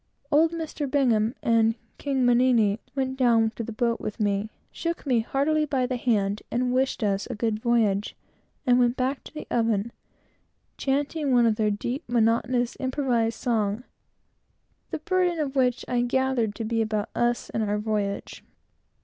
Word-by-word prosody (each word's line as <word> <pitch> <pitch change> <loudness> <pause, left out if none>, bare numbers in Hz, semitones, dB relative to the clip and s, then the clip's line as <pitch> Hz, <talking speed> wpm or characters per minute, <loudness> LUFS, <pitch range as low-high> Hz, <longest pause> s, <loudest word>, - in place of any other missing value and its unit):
Old 320 +3 +4
"Mr. 315 -4 -4
Bingham" 240 -5 +2
and 225 -1 +3 0.2
"King 270 -3 0
Mannini" 240 -4 +3 0.2
went 265 -1 -1
down 230 -3 +3
to 230 - -6
the 230 - -6
boat 235 0 -1
with 215 - -5
me, 205 0 0 0.2
shook 335 -1 -4
me 250 -4 +2
heartily 285 +6 +1
by 270 -4 0
the 255 0 -2
hand, 210 -4 0
wished 250 +1 0
us 200 -1 0
a 250 - -5
good 215 0 -1
voyage, 220 -4 +1 0.5
and 245 0 +4
went 245 0 +2
back 260 +2 -1
to - - -10
the 305 - -7
oven, 225 -1 +1 0.8
chanting 285 +1 -1
one 245 -2 +5
of 225 -2 +3
their 215 -1 +1
deep 240 +8 -3
monotonous 240 +1 +1 0.5
songs, 225 -1 -1 1.1
the - - -3
burden 365 -3 0
of 290 -3 -2
which 250 -2 +1
I 245 -1 +1
gathered 245 -3 0
to 230 - -4
be 225 +1 0
about 215 -1 -1
us 240 0 0
and 225 - -1
our 210 0 0
voyage. 210 -2 -3
240 Hz, 160 wpm, -26 LUFS, 220-265 Hz, 1.1 s, one